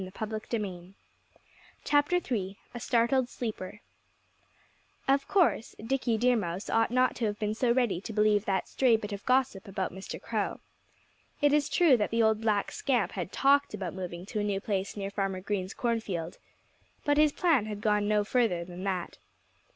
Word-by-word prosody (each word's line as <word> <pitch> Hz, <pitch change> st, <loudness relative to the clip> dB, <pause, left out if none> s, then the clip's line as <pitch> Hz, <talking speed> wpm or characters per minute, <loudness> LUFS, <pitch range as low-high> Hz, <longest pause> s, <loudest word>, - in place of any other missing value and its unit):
III 200 Hz, -2 st, -5 dB, 1.8 s
A 240 Hz, -, -5 dB
STARTLED 240 Hz, +2 st, +2 dB
SLEEPER 210 Hz, -4 st, -5 dB, 1.3 s
Of 275 Hz, +1 st, +2 dB
course 355 Hz, -, +2 dB
Dickie 235 Hz, 0 st, 0 dB
Deer 245 Hz, +2 st, +3 dB
Mouse 185 Hz, -3 st, -3 dB
ought 225 Hz, 0 st, +3 dB
not 255 Hz, +1 st, +2 dB
to 235 Hz, -, -1 dB
have 205 Hz, -1 st, -1 dB
been 210 Hz, 0 st, -1 dB
so 235 Hz, +2 st, +1 dB
ready 235 Hz, -8 st, +1 dB
to 220 Hz, -, -6 dB
believe 210 Hz, -1 st, +3 dB
that 190 Hz, -2 st, 0 dB
stray 250 Hz, -4 st, +3 dB
bit 210 Hz, -1 st, -7 dB
of 200 Hz, 0 st, -6 dB
gossip 255 Hz, -6 st, +1 dB
about 190 Hz, -2 st, -3 dB
Mr. 190 Hz, +1 st, -7 dB
Crow. -, -, -2 dB, 0.8 s
It 290 Hz, 0 st, +3 dB
is 295 Hz, -1 st, +2 dB
true 320 Hz, -8 st, +5 dB
that 210 Hz, -, 0 dB
the 230 Hz, 0 st, +2 dB
old 220 Hz, 0 st, +2 dB
black 210 Hz, -3 st, +1 dB
scamp 250 Hz, -6 st, 0 dB
had 180 Hz, -1 st, -5 dB
talked 280 Hz, -3 st, +3 dB
about 190 Hz, -4 st, -4 dB
moving 180 Hz, -1 st, -6 dB
to 210 Hz, -, -4 dB
a -, -, 0 dB
new 200 Hz, -2 st, 0 dB
place 195 Hz, 0 st, -3 dB
nearer 195 Hz, -1 st, -3 dB
Farmer 195 Hz, -2 st, -2 dB
Green's 190 Hz, -1 st, -3 dB
cornfield. 210 Hz, -9 st, -2 dB, 0.7 s
But 290 Hz, 0 st, +3 dB
his 305 Hz, -1 st, +5 dB
plan 295 Hz, -, +2 dB
had 210 Hz, -1 st, -5 dB
gone 210 Hz, -1 st, +2 dB
no 210 Hz, 0 st, +3 dB
further 205 Hz, -7 st, +1 dB
than 180 Hz, +1 st, -8 dB
that. 185 Hz, -3 st, -3 dB
215 Hz, 165 wpm, -29 LUFS, 195-245 Hz, 1.8 s, true